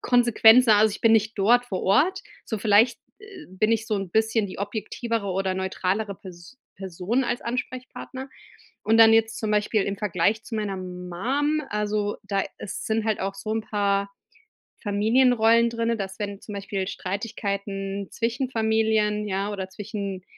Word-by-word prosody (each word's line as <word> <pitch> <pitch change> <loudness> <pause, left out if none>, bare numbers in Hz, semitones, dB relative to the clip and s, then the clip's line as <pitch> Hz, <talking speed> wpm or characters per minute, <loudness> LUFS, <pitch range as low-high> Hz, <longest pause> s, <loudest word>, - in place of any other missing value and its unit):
Konsequenzen. 240 0 +5
Also, 215 +1 +5
ich 210 - -7
bin 225 -1 +5
nicht 220 0 +2
dort 235 +5 +4
vor 190 -6 -4
Ort. 290 - +2 0.2
So 220 - -4
vielleicht, 220 +3 +4 0.2
äh, 405 -6 -12
bin 200 +4 0
ich 220 -1 0
so 215 - +1
'n 195 -3 -4
bisschen 220 +1 +1
die 185 - -9
objektivere 215 +2 -3
oder 190 0 -1
neutralere 190 +2 -2
Pers 180 +5 -13 0.2
Person 190 +7 -2
als 240 - -2
Ansprechpartner. 255 +2 -6 0.6
Und 220 +1 +3
dann 225 0 +8
jetzt 225 0 +2
zum 215 - -2
Beispiel 210 0 +1
im 200 +1 -3
Vergleich 205 +2 0
zu - - -7
meiner 210 -3 -2
Mum, 185 - -2
also 210 0 -1
da 200 -1 -1 0.2
ist - - -6
sind 220 0 0
halt 220 -1 0
auch 195 +1 -2
so 195 +2 -6
'n 225 - 0
paar 200 -2 0 0.7
Familienrollen 230 +2 +3
drinne, 230 0 -1
dass 190 -2 -6
wenn 205 -1 -5
zum 210 - -9
Beispiel 195 -1 -3
Streitigkeiten 200 -1 -4
zwischen 235 +3 -2
Familien, 220 -2 +1
ja, 200 +1 -2
oder 190 -2 -5
zwischen 200 -2 -6
210 Hz, 160 wpm, -25 LUFS, 195-225 Hz, 0.7 s, dann